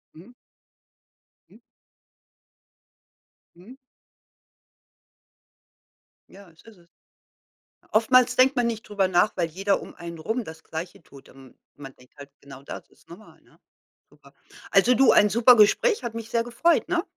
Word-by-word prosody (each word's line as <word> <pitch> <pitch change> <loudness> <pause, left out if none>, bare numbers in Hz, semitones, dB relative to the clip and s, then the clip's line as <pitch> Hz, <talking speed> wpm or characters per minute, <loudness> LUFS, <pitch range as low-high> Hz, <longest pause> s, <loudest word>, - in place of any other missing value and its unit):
Mhm. 195 +10 -16 1.2
Mhm. - - -21 2.0
Mhm. 195 +9 -16 2.5
Ja, 195 -2 -17
das 165 - -23
ist 225 -4 -18
es. 170 -1 -25 1.0
Oftmals 250 +3 +2
denkt 265 +1 +3
man 245 - 0
nicht 225 -2 -5
drüber 200 -2 -1
nach, 185 +4 +1
weil 170 -2 -2
jeder 195 +5 -2
um - - -12
einen 170 -1 -10
rum 220 +9 -4
das 160 -2 -12
Gleiche 165 +1 -9
tut. 135 -2 -18
Ähm, 135 -1 -18 0.2
man 135 -2 -12
denkt 125 0 -24
halt 140 -1 -13
genau 140 -1 -14
das, - - -10
das - - -28
ist - - -30
normal, 180 +6 -16
ne? - - -27 0.5
Super. - - -22 0.4
Also 250 - +3
du, 265 0 +4
ein 205 0 +4
super 235 +2 +5
Gespräch, 255 - +2
hat 235 -2 -6
mich 230 0 -8
sehr 230 -1 -1
gefreut, 315 +9 0
ne? 350 -1 -1
210 Hz, 145 wpm, -23 LUFS, 165-240 Hz, 2.5 s, super